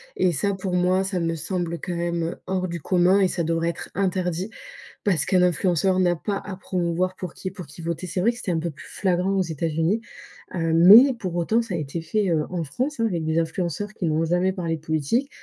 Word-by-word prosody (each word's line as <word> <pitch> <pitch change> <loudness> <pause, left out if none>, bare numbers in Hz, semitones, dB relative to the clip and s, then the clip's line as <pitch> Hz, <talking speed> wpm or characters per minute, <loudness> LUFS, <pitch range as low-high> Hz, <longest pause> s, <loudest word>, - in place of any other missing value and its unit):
et 185 - +2
ça, 195 +6 0
pour 190 -1 -4
moi, 180 +1 +2
ça 190 -1 -2
me 165 -1 -1
semble 170 +1 -3
quand 180 -2 -4
même, 170 0 -1
heu, 165 - -3
hors 185 -1 -1
du 170 -2 -5
commun 185 +4 +3
et 195 - +4
ça 175 -1 -2
devrait 165 +1 0
être 170 - -6
interdit 185 0 -1 0.5
parce 190 -6 +1
qu'un 185 -1 +3
influenceur 180 +1 +2
n'a 175 -1 +3
pas 200 +4 -3
à 200 - -6
promouvoir 180 0 -1
pour 180 -3 -6
qui 185 - -5
pour 185 -2 -9
qui 145 +4 -12
voter. 170 +2 -3
C'est 180 - -3
vrai 230 - +4
que 235 - -11
c'était 195 - -3
un 170 - 0
peu 170 0 -3
plus - - -13
flagrant 185 0 0
aux 190 - +2
États-Unis, 165 +5 -1 0.5
heu, 165 -2 0
mais 210 +11 +9
pour 190 -7 -5
autant, 215 +7 +2
ça 230 -6 -4
a - - -1
été 155 +2 -4
fait, 195 +4 0
heu, 155 -2 +1
en 175 -2 -2
France, 255 - -3
hein, 230 - +2
avec 170 -6 -2
des 160 +1 0
influenceurs 175 +4 -2
qui 195 - -4
n'ont 160 0 +1
jamais 180 +3 +1
parlé 170 -4 -2
de - - -17
politique 160 - 0
180 Hz, 235 wpm, -24 LUFS, 165-190 Hz, 0.5 s, mais